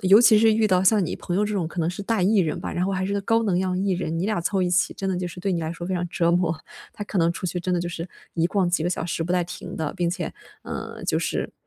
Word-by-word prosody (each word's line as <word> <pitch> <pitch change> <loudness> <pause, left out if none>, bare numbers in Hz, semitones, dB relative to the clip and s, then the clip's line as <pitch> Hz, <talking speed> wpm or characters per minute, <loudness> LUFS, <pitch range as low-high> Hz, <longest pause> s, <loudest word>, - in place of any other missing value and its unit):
尤 195 +2 +7
其 220 -2 +7
是 225 0 +5
遇 220 0 +3
到 185 -3 +3
像 200 0 +4
你 - - -3
朋 175 - -3
友 205 - +3
这 210 - -2
种 185 -6 -1
可 175 - -9
能 160 - +1
是 180 +3 -6
大 215 -1 0
E 205 +4 +4
人 165 -5 +1
吧， - - -5
然 175 - -1
后 - - 0
还 190 0 -1
是 200 - -2
个 200 - 0
高 225 +3 +2
能 195 -5 +1
量 185 0 0
E 195 +1 0
人， 170 -2 -2
你 175 - -1
俩 215 -4 0
凑 190 +3 0
一 180 - +1
起 180 +1 +2
真 195 - -3
的 185 - -1
就 180 -1 -2
是 175 - -10
对 195 +2 -1
你 170 - 0
来 160 0 -2
说 170 0 -6
非 190 - -1
常 175 0 -1
折 170 0 +1
磨， 170 -2 +1 0.4
他 205 - -5
可 205 - -2
能 165 0 +4
出 175 - -4
去 180 0 -2
真 180 +1 -2
的 175 - +1
就 175 - -2
是 170 +1 -5 0.2
一 165 0 +1
逛 185 0 +1
几 175 -2 +1
个 170 - +1
小 170 - -2
时 170 -1 -2
不 165 - -4
带 180 - +2
停 175 - -8
的， 155 -2 -2
并 175 -2 0
且 175 -1 -3 0.3
呃， - - -6
就 - - +1
是 - - -2
180 Hz, 355 characters per minute, -24 LUFS, 170-195 Hz, 0.4 s, 尤